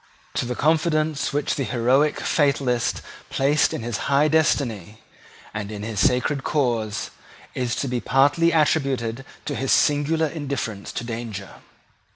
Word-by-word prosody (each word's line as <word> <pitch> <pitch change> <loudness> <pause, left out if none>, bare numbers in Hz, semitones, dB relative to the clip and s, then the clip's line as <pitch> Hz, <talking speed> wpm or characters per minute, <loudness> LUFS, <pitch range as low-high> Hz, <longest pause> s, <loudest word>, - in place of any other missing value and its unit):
To 125 - -1
the 125 - -3
confidence 155 -1 +1
which 145 0 0
the 140 - -2
heroic 130 +5 +2
fatalist 135 -5 +1 0.3
placed 145 +3 +2
in - - -4
his 115 -2 -2
high 140 +2 +4
destiny 120 - 0 0.5
and 105 -1 -4
in 105 -1 -6
his 110 -2 -4
sacred 135 +4 +2
cause 120 -7 -1 0.4
is 125 -1 -1
to 140 - -2
be 125 -1 -1
partly 140 +8 +3
attributed 135 -6 +1 0.2
his 135 -2 -2
singular 155 +1 +3
indifference 140 -9 -4
to - - -4
danger. 115 -4 -6
135 Hz, 135 wpm, -23 LUFS, 115-150 Hz, 0.5 s, high